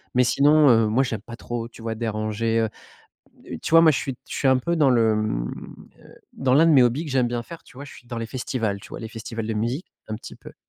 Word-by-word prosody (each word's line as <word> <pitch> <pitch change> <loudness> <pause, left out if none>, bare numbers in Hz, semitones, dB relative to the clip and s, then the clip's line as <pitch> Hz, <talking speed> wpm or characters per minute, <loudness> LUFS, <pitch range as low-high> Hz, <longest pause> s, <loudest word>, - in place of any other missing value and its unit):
Mais 125 - +5
sinon, 145 +3 +4
heu, 115 -2 +4
moi, 120 +5 +2
j'aime 115 -5 -4
pas 115 +2 -10
trop, 120 -1 -5
tu 115 - -15
vois, 115 0 -3
déranger 110 0 -1
heu. 110 -1 +1 0.8
Heu, - - -5
tu - - -4
vois, 165 +1 +8
moi 160 - +7
je - - 0
suis 135 -3 -4
je - - -6
suis 135 - +1
un 130 - +4
peu 170 +7 -1
dans 145 -4 +4
le, 115 -3 +3
mmh, - - -2 0.5
heu, - - -17 0.2
dans 130 -1 +1
l'un 160 +3 +5
de 165 - +5
mes 135 -4 +7
hobbies 125 +7 +1
que 150 - -7
j'aime 125 -2 +2
bien 120 0 -3
faire, 170 +3 -11
tu - - -19
vois, 140 - -8
je 145 - -12
suis 120 - -16
dans 120 -1 -5
les 115 - -4
festivals, 115 -4 -3
tu - - -13
vois? - - -7
Les 110 - -6
festivals 115 0 -6
de 110 - -2
musique, 120 - -2 0.2
un 110 - -3
petit 115 - -11
peu - - -14
120 Hz, 280 wpm, -23 LUFS, 110-135 Hz, 0.8 s, vois